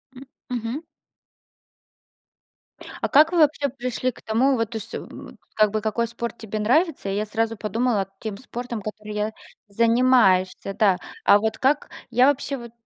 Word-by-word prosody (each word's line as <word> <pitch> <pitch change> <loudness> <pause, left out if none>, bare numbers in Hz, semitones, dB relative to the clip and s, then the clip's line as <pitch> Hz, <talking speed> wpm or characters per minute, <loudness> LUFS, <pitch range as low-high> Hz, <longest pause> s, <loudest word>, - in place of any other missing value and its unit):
М, 260 - -10 0.3
мгм. 245 +5 -3 2.2
А - - -1
как 310 +4 +6
вы 345 - +1
вообще 290 -2 +3
пришли 255 0 -2
к - - -17
тому, 255 +5 +2
вот, 230 -1 -2
то 225 - -3
есть, 225 +1 -9
м, - - -9 0.2
как 215 -2 +4
бы 215 -1 -1
какой 230 +2 -1
спорт 235 0 -5
тебе 215 -1 -5
нравится? 265 - +1
И 195 - -1
я 210 +1 -1
сразу 225 +1 -1
подумала 215 -2 0
тем 215 -3 -5
спортом, 240 -2 -6
который 215 0 -7
я 210 +1 -1 0.4
занимаешься, 220 -4 +3
да. 195 -4 +3 0.3
А 205 - +7
вот 220 +1 -1
как, 285 +3 +1 0.2
я 250 +3 +4
вообще 280 0 0
вот 235 -1 -10
230 Hz, 165 wpm, -23 LUFS, 215-255 Hz, 2.2 s, А